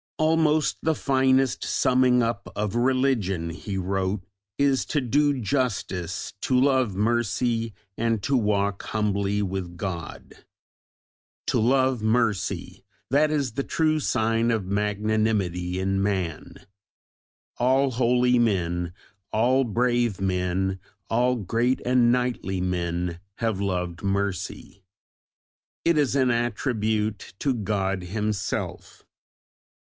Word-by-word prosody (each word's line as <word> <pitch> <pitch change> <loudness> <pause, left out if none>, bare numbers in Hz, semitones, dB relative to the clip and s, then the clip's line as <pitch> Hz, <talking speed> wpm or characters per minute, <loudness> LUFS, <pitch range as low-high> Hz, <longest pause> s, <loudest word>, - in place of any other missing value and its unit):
"Almost 155 -1 +2
the 160 0 +1
finest 130 -3 +2
summing 125 -1 +3
up 115 -4 -3
of 105 -1 -2
religion," 120 -9 +1
he 95 +3 -5
wrote, 95 +1 -1 0.4
"is 140 -2 +2
'to 150 - 0
do 145 +2 +2
justice, 100 - -2
to 130 -1 +2
love 130 -6 +2
mercy, 115 +1 0 0.2
and 115 -2 0
to 140 - +1
walk 100 -3 +1
humbly 105 -1 0
with 95 -3 -4
God.'" 85 -4 -6 1.0
"To - - +1
love 130 +1 +2
mercy!" 110 -2 0 0.3
That 150 +3 +4
is 145 -5 0
the 140 +5 -2
true 155 +1 +1
sign 115 -3 +1
of 110 -4 0
magnanimity 105 -3 0
in 95 +1 0
man. 90 -4 -2 1.0
All 130 +2 +3
holy 125 0 +3
men, 90 -6 0 0.4
all 125 +5 +3
brave 120 -2 +1
men, 95 0 -1 0.3
all 125 +2 +3
great 120 +4 0
and 125 -1 +4
knightly 125 -6 -1
men 90 -1 -2 0.2
have 110 -4 -1
loved 90 -3 -2
mercy. 100 -1 -3 1.0
"It 170 - +4
is 145 -3 +2
an 130 -3 +3
attribute 110 -4 -1
to 135 +4 0
God 100 -4 -1
Himself." 105 +1 -3
110 Hz, 110 wpm, -25 LUFS, 95-125 Hz, 1.0 s, That